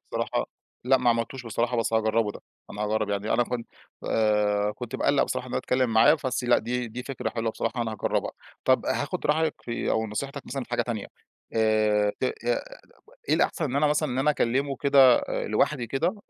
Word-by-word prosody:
بصراحة، -, -, -1 dB, 0.4 s
لأ 130 Hz, +1 st, +5 dB
ما 125 Hz, -1 st, +3 dB
عملتوش 115 Hz, +2 st, -2 dB
بصراحة 120 Hz, +2 st, -1 dB
بس 115 Hz, 0 st, 0 dB
هاجرّبه 110 Hz, -1 st, +2 dB
ده، -, -, -11 dB, 0.3 s
أنا 105 Hz, +1 st, -5 dB
هاجرّب 110 Hz, 0 st, 0 dB
يعني، 100 Hz, +2 st, -1 dB
أنا 120 Hz, -, +3 dB
كنت 120 Hz, -1 st, -4 dB, 0.4 s
آآ، 105 Hz, -1 st, +2 dB
كنت 120 Hz, +1 st, -5 dB
باقلّق -, -, +2 dB
بصراحة -, -, -3 dB
إن -, -, -9 dB
أنا -, -, +1 dB
اتكلّم 125 Hz, -2 st, 0 dB
معاه 110 Hz, +8 st, +6 dB
بس 130 Hz, 0 st, -1 dB
لأ، 120 Hz, 0 st, +4 dB
دي 120 Hz, +1 st, -3 dB
دي 125 Hz, +3 st, -6 dB
فكرة 135 Hz, -2 st, -4 dB
حلوة 115 Hz, -1 st, -2 dB
بصراحة 120 Hz, +2 st, -2 dB
أنا 110 Hz, -1 st, -3 dB
هاجرّبها. 105 Hz, -, -1 dB, 0.3 s
طَب -, -, +3 dB
هاخد -, -, -2 dB
رأيك 160 Hz, +2 st, +2 dB
في 120 Hz, -1 st, -3 dB
أو 110 Hz, 0 st, +1 dB
نصيحتك 140 Hz, +6 st, -5 dB
مثلًا 135 Hz, 0 st, -4 dB
في -, -, -26 dB
حاجة 120 Hz, -, +1 dB
تانية 115 Hz, -4 st, -4 dB, 0.5 s
آآ، 110 Hz, -2 st, +3 dB
ت -, -, 0 dB
آآ -, -, +1 dB, 1.0 s
إيه -, -, +4 dB
الأحسن، 155 Hz, -, +1 dB
إن 135 Hz, -, -3 dB
أنا 150 Hz, +1 st, +3 dB
مثلًا، 150 Hz, 0 st, +1 dB
إن 125 Hz, -, -3 dB
أنا 135 Hz, +3 st, +3 dB
اكلّمه 135 Hz, +2 st, 0 dB
كده 135 Hz, -3 st, +6 dB
آآ -, -, -2 dB
لوحدي 125 Hz, -6 st, +1 dB
كده 165 Hz, -, 0 dB
120 Hz, 205 wpm, -26 LUFS, 110-135 Hz, 1.0 s, معاه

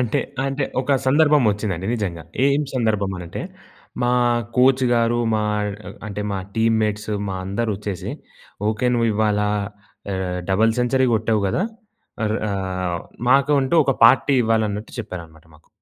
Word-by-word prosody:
అంటే, 120 Hz, -3 st, 0 dB, 0.3 s
అంటే 135 Hz, +1 st, -1 dB, 0.2 s
ఒక 140 Hz, +2 st, 0 dB
సందర్భం 150 Hz, 0 st, +4 dB
వచ్చిందండి 100 Hz, -3 st, -3 dB
నిజంగా. 95 Hz, -7 st, -3 dB, 0.2 s
ఏం 140 Hz, +1 st, +3 dB
సందర్భం 105 Hz, -5 st, 0 dB, 0.2 s
అంటే? 85 Hz, -, -6 dB, 0.6 s
మా 120 Hz, 0 st, +2 dB, 0.4 s
కోచ్ 130 Hz, +1 st, +4 dB
గారు, 120 Hz, 0 st, +2 dB, 0.2 s
మా 110 Hz, -, +1 dB, 0.6 s
అంటే, 105 Hz, 0 st, -5 dB
మా 100 Hz, -, -2 dB, 0.2 s
టీమ్‌ 115 Hz, 0 st, +2 dB
మేట్స్ 105 Hz, 0 st, -2 dB, 0.2 s
మా 95 Hz, -, -3 dB
అందరొచ్చేసి," 100 Hz, -1 st, -3 dB, 0.6 s
ఓకే, 110 Hz, +3 st, 0 dB
నువ్వు 115 Hz, -1 st, +2 dB
ఇవ్వాళ 105 Hz, 0 st, +1 dB, 0.7 s
ఆహ్, 90 Hz, -1 st, -2 dB
డబుల్ 110 Hz, +4 st, +3 dB
సెంచరీ 130 Hz, +1 st, +2 dB
గొట్టావు 110 Hz, -1 st, +1 dB
గదా! 175 Hz, -, 0 dB, 0.6 s
అర్ 110 Hz, +1 st, 0 dB
ఆహ్, 95 Hz, -3 st, -2 dB, 0.3 s
మాకంటూ 140 Hz, +2 st, +3 dB
ఒక 135 Hz, -, +1 dB
పార్టీ 135 Hz, +4 st, +5 dB
''ఇవ్వాలన్నట్టు" 110 Hz, -1 st, -1 dB
చెప్పారనమాట 85 Hz, -6 st, -8 dB
మాకు. 75 Hz, -, -23 dB
110 Hz, 135 wpm, -21 LUFS, 100-125 Hz, 0.7 s, పార్టీ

